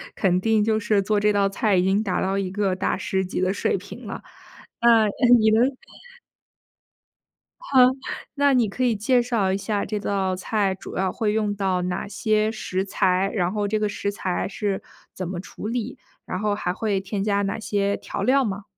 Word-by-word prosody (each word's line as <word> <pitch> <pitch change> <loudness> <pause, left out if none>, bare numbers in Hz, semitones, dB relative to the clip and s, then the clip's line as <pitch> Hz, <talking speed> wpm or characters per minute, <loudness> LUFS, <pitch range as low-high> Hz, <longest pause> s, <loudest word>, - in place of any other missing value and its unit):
肯 180 -3 +2
定 220 0 +2
就 215 0 +1
是 210 -1 +1
做 205 +2 +1
这 210 +1 +3
道 200 -1 +2
菜 200 +1 +1
已 180 - +3
经 195 +3 +2
达 195 -4 -1
到 195 +1 0
一 190 -2 -2
个 195 -1 0
大 190 - -1
师 190 0 -1
级 185 - -4
的 185 +1 +1
水 - - 0
平 - - -10
了。 - - -6 0.6
那， 230 -2 +5 0.3
你 220 - +4
能 245 +5 +3 1.8
哈， 280 - +2 0.6
那 285 -1 +3
你 240 -4 +3
可 255 +6 -2
以 240 - +2
介 240 +4 +2
绍 225 -6 0
一 195 - 0
下 205 0 -2
这 210 - -3
道 195 -2 -1
菜 195 +1 0
主 190 - -9
要 190 0 +1
会 215 -3 0
用 210 -1 0
到 190 -2 0
哪 180 0 -3
些 215 +1 0
食 190 -4 -3
材？ 190 0 +1
然 180 -3 0
后 205 -1 -1
这 215 +2 0
个 210 0 0
食 200 0 -3
材 185 -2 -2
是 200 -1 -3 0.3
怎 185 -2 -4
么 180 -1 -4
处 195 - -8
理？ 235 -1 -3 0.3
然 185 - -4
后 210 +1 0
还 180 -3 -2
会 200 0 -1
添 195 +1 -3
加 200 -1 +1
哪 200 +1 -2
些 200 -2 0
调 - - -5
料 270 +1 +3
吗？ 200 -2 -4
205 Hz, 215 characters per minute, -23 LUFS, 190-215 Hz, 1.8 s, 那